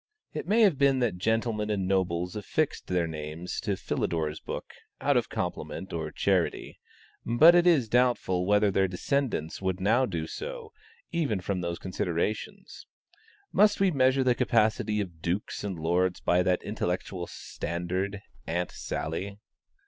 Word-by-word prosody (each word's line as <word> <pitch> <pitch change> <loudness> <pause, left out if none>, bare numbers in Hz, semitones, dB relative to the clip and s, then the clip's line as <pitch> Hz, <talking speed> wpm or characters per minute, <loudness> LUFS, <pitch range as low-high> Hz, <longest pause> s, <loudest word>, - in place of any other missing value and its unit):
It - - -5
may 225 +3 +4
have 190 -10 +4
been 140 -1 +4
that 115 -8 0
gentlemen 110 0 0
and 100 -3 0
nobles 90 -1 0
affixed 140 +8 -1
their 90 -2 +1
names 80 +2 -5
to 100 -2 -2
Philidor's 80 -4 -2
book, - - -6 0.3
out - - +2
of - - +1
compliment 75 +5 -4
or 80 -2 -3
charity, 95 -2 0 0.4
but 150 +9 +7
it 175 0 +5
is 150 -9 +4
doubtful 115 -7 +2
whether 105 0 +4
their 95 0 +2
descendants 95 - -2
would 95 -1 -1
now 115 +7 +3
do 85 -4 -3
so, 475 - -7 0.4
even 140 - 0
from 90 0 -2
those 85 -1 -3
considerations. 90 +2 -3 0.6
Must 210 +1 +4
we 195 -1 +4
measure 130 -2 +3
the 125 -1 +4
capacity 110 -3 +1
of 85 -5 -7
dukes 90 +6 -2
and 100 -3 -3
lords 90 +3 +1
by 90 +1 +2
that 90 0 +1
intellectual 90 -3 -3
standard, 90 +4 -4 0.3
"Aunt 90 +1 -1
Sally?" 95 +6 -4
95 Hz, 150 wpm, -28 LUFS, 90-120 Hz, 0.6 s, but